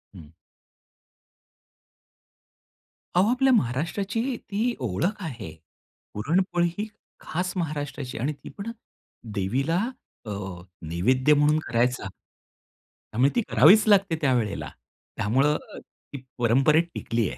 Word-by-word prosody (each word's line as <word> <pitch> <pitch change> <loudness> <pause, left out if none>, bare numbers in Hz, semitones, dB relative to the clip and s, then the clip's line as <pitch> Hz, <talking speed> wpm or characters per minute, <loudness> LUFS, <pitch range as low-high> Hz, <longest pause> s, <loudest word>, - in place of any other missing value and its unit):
हं. - - -12 2.9
अहो, 190 +4 +4
आपल्या 265 +1 +3
महाराष्ट्राची 190 - 0 0.2
ती 220 +5 -2
ओळख 130 - -1
आहे. 115 - -6 0.6
पुरणपोळी 175 - +1
ही 210 +1 -2 0.3
खास 180 +2 -3
महाराष्ट्राची 145 -4 -4
आणि 150 +4 -1
ती 145 - -12
पण 205 +3 -5 0.6
देवीला 130 - 0 0.5
अ, - - -7 0.6
नैवेद्य 130 - +3
म्हणून 150 +1 +3
करायचा. 120 -3 0 1.0
त्यामुळे 125 +5 +4
ती 240 - +3
करावीच 190 - +7
लागते 195 -5 +4
त्यावेळेला. 120 -8 0 0.5
त्यामुळं 135 +8 +2 0.2
ती 140 - -13 0.2
परंपरेत 135 +7 +4
टिकली 115 -4 -1
आहे. - - -8
145 Hz, 100 wpm, -25 LUFS, 125-185 Hz, 2.9 s, करावीच